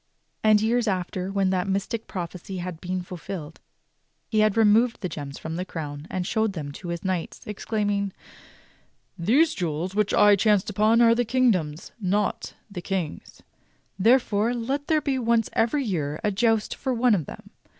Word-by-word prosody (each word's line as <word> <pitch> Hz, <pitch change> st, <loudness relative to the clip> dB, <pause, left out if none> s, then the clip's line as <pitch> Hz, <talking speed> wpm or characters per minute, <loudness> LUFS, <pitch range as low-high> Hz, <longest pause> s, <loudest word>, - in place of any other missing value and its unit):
And 215 Hz, -1 st, +5 dB
years 235 Hz, +1 st, +1 dB
after, 185 Hz, -1 st, -2 dB
when 195 Hz, -1 st, +1 dB
that 185 Hz, 0 st, 0 dB
mystic 200 Hz, +4 st, -2 dB
prophecy 185 Hz, 0 st, -6 dB
had 175 Hz, -2 st, -6 dB
been 185 Hz, 0 st, -3 dB
fulfilled, 175 Hz, -3 st, -7 dB, 0.7 s
he 215 Hz, -, +1 dB
had 215 Hz, 0 st, +3 dB
removed 225 Hz, +2 st, +4 dB
the 185 Hz, -, -2 dB
gems 145 Hz, -3 st, -7 dB
from 160 Hz, +1 st, -5 dB
the 180 Hz, -, -2 dB
crown 150 Hz, -4 st, -6 dB
and 185 Hz, -1 st, -2 dB
showed 220 Hz, +1 st, 0 dB
them 150 Hz, -5 st, -5 dB
to 175 Hz, +5 st, -9 dB
his 170 Hz, -1 st, -4 dB
knights, 185 Hz, -3 st, -3 dB
exclaiming: 205 Hz, -1 st, -1 dB, 1.0 s
"These 245 Hz, -, +3 dB
jewels 170 Hz, +1 st, -3 dB
which 210 Hz, 0 st, +1 dB
I 205 Hz, 0 st, +6 dB
chanced 210 Hz, 0 st, +2 dB
upon 215 Hz, +3 st, +3 dB
are 230 Hz, -1 st, +6 dB
the 240 Hz, +1 st, +1 dB
kingdom's, 205 Hz, -11 st, 0 dB
not 205 Hz, +2 st, -1 dB
the 200 Hz, -5 st, -7 dB
King's. 180 Hz, -4 st, -4 dB, 0.6 s
Therefore, 230 Hz, 0 st, +3 dB
let 270 Hz, +5 st, -2 dB
there 310 Hz, -1 st, +2 dB
be 275 Hz, -2 st, -1 dB
once 230 Hz, -2 st, +1 dB
every 235 Hz, +6 st, +1 dB
year 155 Hz, -, -2 dB
a 210 Hz, -, +2 dB
joust 225 Hz, +1 st, +1 dB
for 260 Hz, -2 st, -2 dB
one 240 Hz, 0 st, +3 dB
of 165 Hz, -8 st, 0 dB
them. -, -, -11 dB
200 Hz, 170 wpm, -25 LUFS, 180-225 Hz, 1.0 s, I